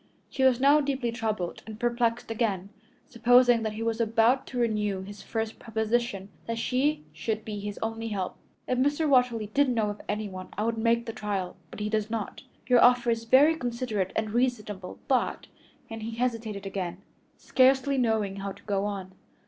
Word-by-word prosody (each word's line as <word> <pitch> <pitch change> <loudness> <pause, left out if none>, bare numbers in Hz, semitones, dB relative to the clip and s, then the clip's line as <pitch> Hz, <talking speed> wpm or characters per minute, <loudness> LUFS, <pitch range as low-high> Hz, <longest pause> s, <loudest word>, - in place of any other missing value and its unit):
She 265 - -1
was 255 -2 +5
now 285 +3 +5
deeply 270 -4 -1
troubled 215 -6 -3
and 215 0 -8
perplexed 235 -1 0
again, 205 -4 -1 0.4
supposing 245 0 +5
that 220 -1 -2
he 220 +1 -4
was 230 0 0
about 230 +3 +3
to 255 - -6
renew 210 -5 0
his 205 +1 -10
first 225 -1 -4
proposition 220 -3 -1 0.2
that 230 0 -2
she 285 +6 0
should 220 -1 -3
be 210 -2 -4
his 205 0 -5
only 225 0 -3
help. 195 -4 -3 0.3
"If 255 0 0
Mr. 290 +4 +2
Watterly 245 -6 +2
did 285 -1 +3
know 220 -4 +1
of 205 - -9
anyone 205 -3 -4
I 210 - 0
would 225 0 -1
make 235 +1 +2
the 225 - -5
trial, 200 -4 -3
but - - -8
he 210 - -1
does 215 0 -1
not. 220 -2 -4 0.2
Your 245 -2 +5
offer 245 -1 +5
is 230 0 -2
very 285 +7 +6
considerate 235 - -2
and 220 -1 -1
reasonable, 210 -6 -1
but 260 -2 +1 0.2
" - - -32
and 225 0 -6
he 225 +1 -5
hesitated 225 -5 -2
again, 190 -1 -4 0.3
scarcely 265 +1 +3
knowing 220 -5 +1
how 195 0 -4
to 200 - -18
go 200 -1 -1
on. 195 -2 -4
225 Hz, 185 wpm, -28 LUFS, 210-245 Hz, 0.4 s, very